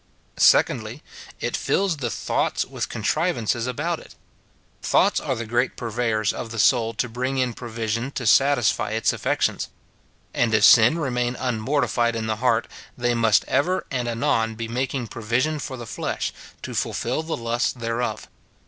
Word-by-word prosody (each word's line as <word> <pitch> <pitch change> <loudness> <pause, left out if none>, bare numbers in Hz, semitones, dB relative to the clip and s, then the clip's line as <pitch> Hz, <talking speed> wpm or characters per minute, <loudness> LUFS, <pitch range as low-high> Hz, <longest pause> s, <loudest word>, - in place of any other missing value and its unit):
2dJy. - - +3 0.4
It - - -2
fills 190 -5 0
the 125 -4 -2
thoughts - - -1
with - - -5
contrivances 120 - 0
about 155 +7 -2
it. - - -15 0.7
Thoughts - - +3
are - - -2
the 115 - -4
great 120 +3 0
purveyors 115 -2 -1
of 115 - -6
the 115 - -7
soul 115 0 +3
to 120 +3 -1
bring 125 +3 -3
in 125 -2 0
provision 115 +1 -3
to 120 - -4
satisfy 135 -4 +3
its 110 - +2
afiections; - - -1 0.7
and 115 -2 +2
if 110 - +2
sin 120 +8 +7
remain 125 -5 -1
un 125 -4 -2
mortified 120 -2 +1
in 115 -1 -2
the 110 -1 -1
heart, 115 -1 +1 0.3
they 120 -1 +1
must 115 -2 +3
ever 185 +6 +1
and 125 -3 -1
anon 115 -1 0
be 115 +1 -4
making 125 +2 -2
provision 120 +8 -1
for 130 -2 -6
the 120 - -7
flesh, - - -3 0.3
to - - -5
fulfil 125 +6 -1
the 160 0 -4
lusts 120 +1 0
thereof. 120 0 -3
120 Hz, 160 wpm, -23 LUFS, 115-130 Hz, 0.7 s, sin